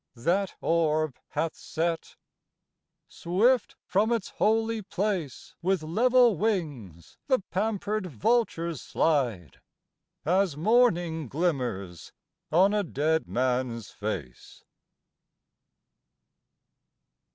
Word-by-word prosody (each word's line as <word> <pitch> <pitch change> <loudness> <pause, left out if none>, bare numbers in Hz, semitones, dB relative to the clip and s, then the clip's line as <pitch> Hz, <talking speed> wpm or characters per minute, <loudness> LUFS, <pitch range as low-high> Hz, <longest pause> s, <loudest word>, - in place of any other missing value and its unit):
That 180 +10 0
orb 155 -4 +1
hath 160 +2 -2
set. 165 0 -3 0.9
Swift 225 +9 +1
from 210 +4 +1
its 230 -5 -1
holy 225 +1 +1
place 185 -8 -3
With 185 -1 0
level 240 +7 +4
wings 145 - -3
the 260 -3 +4
pampered 210 +1 -1
vultures 170 - 0
slide, 120 - -1 0.6
As 180 -2 +2
morning 175 - +2
glimmers 120 - -2 0.4
on 190 +6 +4
a 210 - +2
dead 160 -2 0
man 125 -1 0
s 115 - -10
face. 90 - -6
170 Hz, 85 wpm, -27 LUFS, 135-210 Hz, 0.9 s, level